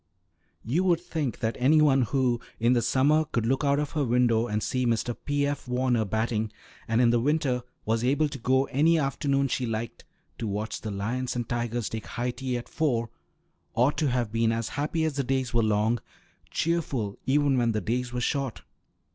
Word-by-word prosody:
You 150 - +1
would 175 -3 +3
think 160 -8 -3
that 110 0 0
any 145 +5 +5
one 140 -3 +5
who, 125 0 +1 0.2
in 120 +2 +4
the 120 - +3
summer, 135 +6 +3
could 115 -7 -2
look 135 +5 +1
out 140 0 +3
of 150 -1 -1
her 150 -3 0
window 120 -2 +2
and 105 -1 -1
see 130 -1 -1
Mr. 115 +1 0
P. 145 0 +1
F. 145 -2 -3
Warner 125 -2 +1
batting, 110 +1 -1 0.4
and 115 +2 +2
in 120 -1 +5
the 120 - +3
winter 135 -1 +1 0.2
was 115 +1 0
able 145 +5 +2
to 140 - -7
go 130 +3 +3
any 160 +5 +4
afternoon 140 -1 +1
she 125 -1 -1
liked, 115 +1 -4 0.4
to 115 - -2
watch 105 +2 -3
the 110 - -4
lions 115 +6 -2
and 120 -2 -2
tigers 120 -1 -2
take 110 -1 -5
high 125 0 -2
tea 130 0 -3
at 120 - -7
four, 120 -7 -1 0.6
ought 125 +5 +3
to 150 -4 +2
have 120 -4 -1
been 115 0 +2
as 115 -1 -2
happy 150 +3 -1
as 150 -3 -2
the 140 - +1
days 130 -2 -1
were 120 - +3
long; 110 +2 +2 0.5
cheerful 140 -11 -1
even 140 0 +3
when 120 -1 +2
the 110 - 0
days 125 +3 -2
were 125 0 -3
short. 135 -1 -2
125 Hz, 200 wpm, -27 LUFS, 115-140 Hz, 0.6 s, any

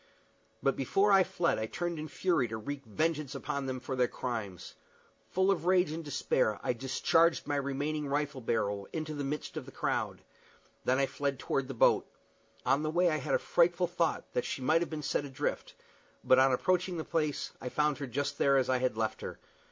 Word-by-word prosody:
But 135 - +3
before 195 +10 +2
I 195 -1 +7
fled 170 -6 0
I 110 - -2
turned 175 +5 -3
in 155 - -4
fury 165 -4 +1
to 110 0 -4
wreak 140 +5 -5
vengeance 155 +3 -1
upon 140 -2 -3
them 130 -1 -3
for 130 +1 -4
their 125 -1 +3
crimes. 110 -9 -5 0.6
Full 190 +1 +3
of 175 -2 -1
rage 180 -4 +4
and 165 +1 -4
despair, 130 -7 0
I - - +1
discharged 155 +7 +2
my 145 - -1
remaining 145 +2 -2
rifle 145 -1 -1
barrel 100 -4 -1
into 155 -1 -4
the 145 -1 -3
midst 145 +2 -4
of - - -6
the - - -9
crowd. - - -2 0.6
Then 130 - +3
I 135 - +3
fled 140 +1 -2
toward 135 +1 -1
the 135 - -6
boat. - - +4 0.6
On 135 +3 +3
the 155 - -1
way 175 +2 +3
I 155 - +1
had 135 - 0
a - - +5
frightful 175 +1 +2
thought 175 -2 0
that 125 - 0
she - - -3
might 160 +5 +3
have 175 - -2
been 155 -2 -5
sent 145 - -1
adrift; 135 - -3 0.5
but, 130 - +5
on 135 0 +5
approaching 180 +6 +1
the 160 - -2
place, 155 -3 -1
I 125 - -4
found 150 0 +1
her 140 - -4
there - - -13
just 145 +3 -2
as 135 -2 +4
I 130 - +2
had 125 -3 0
left 110 -1 -1
her. - - -6
145 Hz, 210 wpm, -31 LUFS, 130-165 Hz, 0.6 s, I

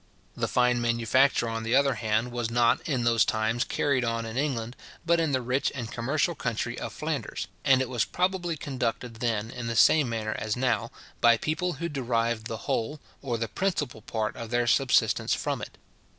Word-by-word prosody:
The - - -1
fine 125 -1 +2
manufacture, 120 +2 +2
on 115 0 -3
the 115 +2 +1
other 140 0 +4
hand, 110 +1 0
was 120 -2 -2
not, 115 0 +3
in 130 -5 0
those 115 -1 +4
times, 110 +3 0
carried 140 -3 0
on 115 -1 -1
in 110 0 -6
England, 125 -4 -2 0.3
but 170 0 +3
in 160 -3 +1
the 130 -2 0
rich 130 +3 0
and 120 -4 -5
commercial 145 +8 0
country 115 -7 -3
of - - -5
Flanders; - - -4 0.2
and 135 -1 +5
it - - -5
was 120 -3 0
probably 180 -2 -1
conducted 125 -4 -3
then, 115 -1 -1
in 120 -1 -5
the 115 - -2
same 145 +3 +5
manner 110 -2 -2
as 110 +2 -2
now, 125 -4 0 0.3
by 115 0 +6
people 170 +7 -1
who 170 +4 -4
derived 115 -6 -1
the 115 -4 -6
whole, 145 +7 -1 0.2
or 125 -4 -2
the 115 0 -2
principal 145 - -2
part 110 0 -3
of 115 -1 -7
their 120 0 +1
subsistence 130 +2 +3
from - - -2
it. - - -8
120 Hz, 195 wpm, -27 LUFS, 115-135 Hz, 0.3 s, by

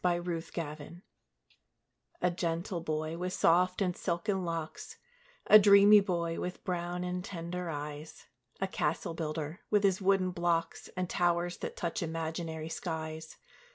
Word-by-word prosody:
THE 175 -1 +2
CASTLE 175 -1 -5
BUILDER 155 +4 -9 1.2
A 180 - +3
gentle 170 +1 -2
boy, 155 +1 -3
with 180 +1 -2
soft 180 +3 +3
and 180 -2 -1
silken 190 +2 -1
locks 165 -2 -5 0.5
A 215 - +9
dreamy 200 +1 +8
boy, 170 -4 -1
with 180 - -5
brown 175 -1 -2
and 180 0 -3
tender 180 -1 -5
eyes, 150 0 -6 0.3
A 195 - 0
castle 190 -2 -1
builder, 155 0 -4
with 210 -1 +3
his 195 -1 +2
wooden 190 -1 +3
blocks, 170 -1 -1
And 185 0 -1
towers 175 0 +1
that - - -6
touch 170 -1 -2
imaginary 160 -1 -3
skies. 160 -2 -5
175 Hz, 140 wpm, -31 LUFS, 165-180 Hz, 1.2 s, A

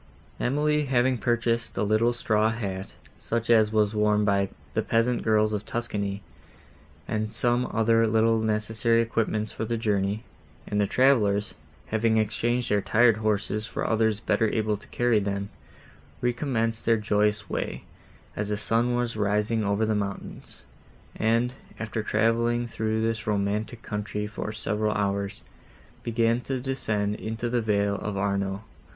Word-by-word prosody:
Emily, 150 +3 +1
having 130 -1 +2
purchased 115 -1 0
a - - +1
little 110 +3 +3
straw 110 -2 +1
hat, 100 -4 -4 0.2
such 115 0 -1
as 110 -2 +5
was 105 -1 +2
worn 105 0 +2
by 100 -1 +2 0.2
the - - +1
peasant 115 +1 +1
girls 110 -1 +2
of 105 0 -2
Tuscany, 100 -4 -3 0.8
and 110 0 -2
some 120 +2 +1
other 115 0 +3
little 115 +1 +3
necessary 110 +1 +1
equipments 110 -2 -1
for 110 - -4
the 115 +1 -1
journey, 105 -1 0 0.4
and 105 0 0
the 100 - +2
travellers, 105 -6 +3 0.4
having 110 0 +2
exchanged 120 +3 0
their 105 0 +3
tired 115 +2 +4
horses 110 0 -1
for - - -3
others 110 -1 +2
better 110 -1 +1
able 110 -1 0
to 105 - -13
carry 120 -3 +2
them, 100 0 -3 0.7
recommenced 120 -3 -1
their 115 -1 +3
joyous 105 -1 +1
way, - - -3 0.5
as 105 0 -2
the 105 - -1
sun 115 +3 +1
was 120 -2 -1
rising 105 +2 +1
over 100 +2 +1
the 110 - +1
mountains, 100 -2 -5 0.5
and, 115 +3 +1 0.3
after 110 0 -3
travelling 115 +2 +1
through 110 -1 -1
this 115 -1 -2
romantic 105 +3 -1
country, 105 0 -3
for 105 0 -5
several 105 0 -1
hours, 100 -1 -2 0.6
began 115 +1 +1
to 130 +1 -3
descend 110 -6 -1
into 115 +2 -4
the 120 -1 +1
vale 100 -2 +1
of 105 -1 -4
Arno. 100 0 -1
110 Hz, 145 wpm, -26 LUFS, 105-115 Hz, 0.8 s, as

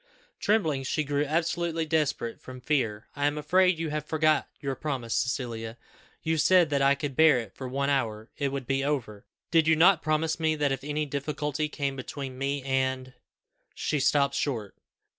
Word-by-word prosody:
Trembling, 160 -11 +1
she 135 +3 -1
grew 145 0 0
absolutely 165 +1 -1
desperate 150 -7 -1
from 130 0 -10
fear. 115 -7 -1
"I 145 0 +1
am 145 +1 -1
afraid 185 +3 +3
you 160 -2 -3
have 150 -1 -2
forgot 155 0 +1
your 140 -2 -2
promise, 130 -5 -3
Cecilia; 115 -2 -2 0.5
you 160 -1 0
said 175 0 +4
that 140 -1 +2
if - - +4
I 140 - +4
could 140 -2 -4
bear 160 -2 +6
it 115 -5 -5
for 130 - -7
one 140 +2 -1
hour, 110 -5 -1
it 140 -2 -1
would 135 -2 -4
be 135 +2 0
over. 120 -8 -3 0.2
Did 165 -2 +4
you 160 - +5
not 170 +1 +5
promise 160 +1 0
me 160 -1 +1
that 145 -2 +1
if 135 -1 -3
any 150 +1 -1
difficulty 150 +1 -2
came 140 -2 -2
between 135 0 -6
me 135 +1 -2
and 130 -1 -1 0.3
" - - -62 0.3
She 150 - -1
stopped 140 0 +3
short. 115 -8 -2
145 Hz, 190 wpm, -27 LUFS, 130-155 Hz, 0.5 s, bear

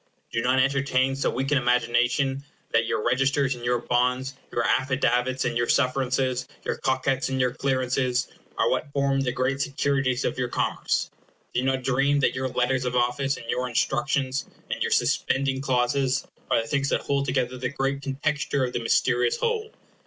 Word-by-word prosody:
Do 115 - 0
not 130 +2 +2
entertain 135 0 +2
so 135 - 0
weak 135 +3 -2
an 140 - +4
imagination 125 +2 +2
as 140 - -10 0.3
that 115 0 +3
your 105 - -1
registers 135 +2 +2
and 120 -1 -10
your 120 0 +2
bonds, 125 +2 0 0.2
your 120 - 0
affidavits 130 -1 +1
and 120 -1 -1
your 120 0 +1
sufferances, 130 -1 +1 0.2
your - - -2
cockets 130 0 0
and 130 0 -1
your 125 -1 +2
clearances, 130 -2 0 0.3
are - - +2
what 145 - -1
form 140 -1 +1
the 130 -2 0
great 130 +2 -1
securities 135 -2 0
of - - -2
your 125 - 0
commerce. - - -1 0.4
Do 125 - +1
not 130 0 0
dream 140 +3 +2
that - - +2
your 130 0 -2
letters 125 +1 0
of 125 0 -1
office, 125 +3 +1
and - - -10
your 125 +1 -1
instructions, 130 +2 0 0.2
and - - -3
your - - +1
suspending 135 -1 +1
clauses, 130 +1 +1 0.2
are - - +3
the - - -10
things 140 0 0
that - - +1
hold 140 0 0
together 130 -1 -1
the 125 -1 -1
great 135 0 -2
contexture 140 0 -1
of 125 - -5
the 120 - -1
mysterious 120 +1 +2
whole. 450 -1 -1
130 Hz, 180 wpm, -25 LUFS, 125-135 Hz, 0.4 s, an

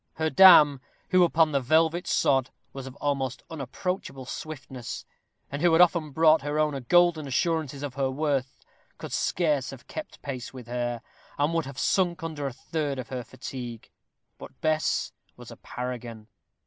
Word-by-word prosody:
Her 160 0 -1
dam, 155 -8 +8 0.3
who 185 -2 +5
upon 160 -2 +3
the 140 - +2
velvet 160 +6 +2
sod 135 -2 +2 0.2
was 135 -1 -7
of 130 - -10
almost 135 -3 -2
unapproachable 155 - -4
swiftness, 130 -4 -7 0.5
and 140 +1 -4
who 175 0 +4
had 165 - +5
often 170 -3 +4
brought 160 +1 +4
her 145 +2 -3
owner 150 -2 +1
golden 170 +2 +3
assurances 145 0 -1
of 140 -3 -4
her 135 0 0
worth, 140 -1 -1 0.4
could - - -8
scarce 150 -7 0
have 135 -3 -10
kept 310 - -8
pace 130 -4 -5
with 125 -2 -9
her, 120 -1 -3 0.3
and 145 +3 +1
would 165 -4 0
have 135 -1 -9
sunk 175 +4 +1
under 155 -3 -3
a - - -4
third 145 +2 -3
of 130 - -6
her 125 -2 -4
fatigue. 125 -1 -8 0.5
But - - -12
Bess 155 0 0 0.3
was - - -11
a - - -11
paragon. 120 -3 -7
145 Hz, 165 wpm, -27 LUFS, 130-160 Hz, 0.5 s, dam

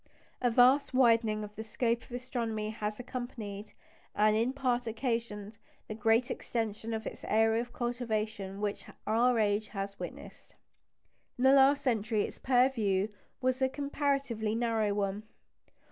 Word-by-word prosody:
A 245 - +3
vast 255 +3 +4
widening 230 -4 +4
of 210 0 -9
the 220 - -5
scope 230 +1 0
of - - -21
astronomy 235 -4 -3
has 210 0 -4
accompanied, 225 -5 -6 0.4
and 215 0 +4
in 230 +3 +2
part 250 -3 -1
occasioned, 225 -3 -3 0.3
the - - -4
great 225 +3 +2
extension 225 -1 -3
of 220 0 -5
its - - -7
area 225 +1 +3
of 245 0 -8
cultivation 220 -5 -3
which 205 -1 -2 0.2
our 235 +3 +3
age 210 0 +1
has 200 -1 -5
witnessed. - - -9 0.8
In 250 - -2
the 265 +1 +7
last 275 +1 +5
century 220 -4 +1
its - - -6
purview 230 -6 +2 0.3
was 255 +1 0
a 260 - +3
comparatively 275 -6 -1
narrow 225 -3 +1
one. 200 0 -1
225 Hz, 145 wpm, -31 LUFS, 215-250 Hz, 0.8 s, the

